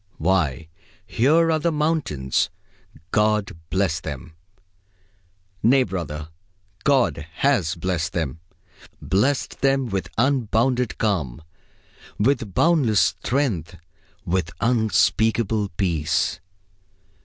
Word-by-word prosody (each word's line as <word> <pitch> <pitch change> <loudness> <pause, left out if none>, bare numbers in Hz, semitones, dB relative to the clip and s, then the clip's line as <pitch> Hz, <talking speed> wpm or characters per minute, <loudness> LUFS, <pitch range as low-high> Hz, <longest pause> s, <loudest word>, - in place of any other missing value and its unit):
Why, 80 -4 0 0.4
here 160 +7 +3
are 160 - +2
the 170 +2 0
mountains! 150 - 0 0.6
God 105 -1 +2 0.2
bless 95 -4 0
them! 75 +1 -7 1.3
Nay, 130 +4 +5
brother, 80 - -5 0.5
God 130 - +2
has 125 - +1
blessed 85 -1 -2
them; 80 -2 -3 0.6
blessed 125 +9 0
them 135 -2 +2
with 95 -2 -3
unbounded 125 -1 +1
calm, 80 - -1 0.7
with 115 -2 +1
boundless 140 - +3
strength, 105 - -1 0.5
with 90 -2 0
unspeakable 110 -1 +2
peace. 80 -6 0
105 Hz, 85 wpm, -23 LUFS, 85-130 Hz, 1.3 s, Nay